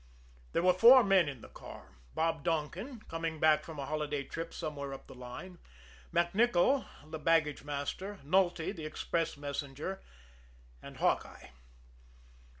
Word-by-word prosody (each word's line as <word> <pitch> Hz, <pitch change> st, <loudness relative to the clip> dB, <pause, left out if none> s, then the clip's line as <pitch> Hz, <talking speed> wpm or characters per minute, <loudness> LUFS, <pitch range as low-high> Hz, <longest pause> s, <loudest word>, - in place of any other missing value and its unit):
There -, -, +1 dB
were 180 Hz, 0 st, +6 dB
four 240 Hz, +7 st, +8 dB
men 195 Hz, -6 st, +4 dB
in 135 Hz, -5 st, -8 dB
the -, -, -11 dB
car: 65 Hz, -, -12 dB, 0.2 s
Bob 160 Hz, -2 st, 0 dB
Donkin, 170 Hz, -, -2 dB
coming 165 Hz, -4 st, -4 dB
back 155 Hz, 0 st, +4 dB
from 160 Hz, -2 st, -9 dB
a 140 Hz, -, -4 dB
holiday 150 Hz, -1 st, -2 dB
trip 165 Hz, +4 st, -6 dB
somewhere 145 Hz, -4 st, -5 dB
up -, -, -13 dB
the -, -, -12 dB
line; 125 Hz, +9 st, -9 dB, 0.5 s
MacNicoll, 195 Hz, +8 st, +3 dB, 0.2 s
the 155 Hz, 0 st, -7 dB
baggage 155 Hz, -2 st, +2 dB
master; 145 Hz, +8 st, -4 dB
Nulty, 180 Hz, +2 st, +2 dB
the 160 Hz, -, -7 dB
express 165 Hz, 0 st, -2 dB
messenger 145 Hz, +5 st, -5 dB, 0.8 s
and -, -, -11 dB
Hawkeye. -, -, -1 dB
160 Hz, 140 wpm, -32 LUFS, 145-180 Hz, 0.8 s, four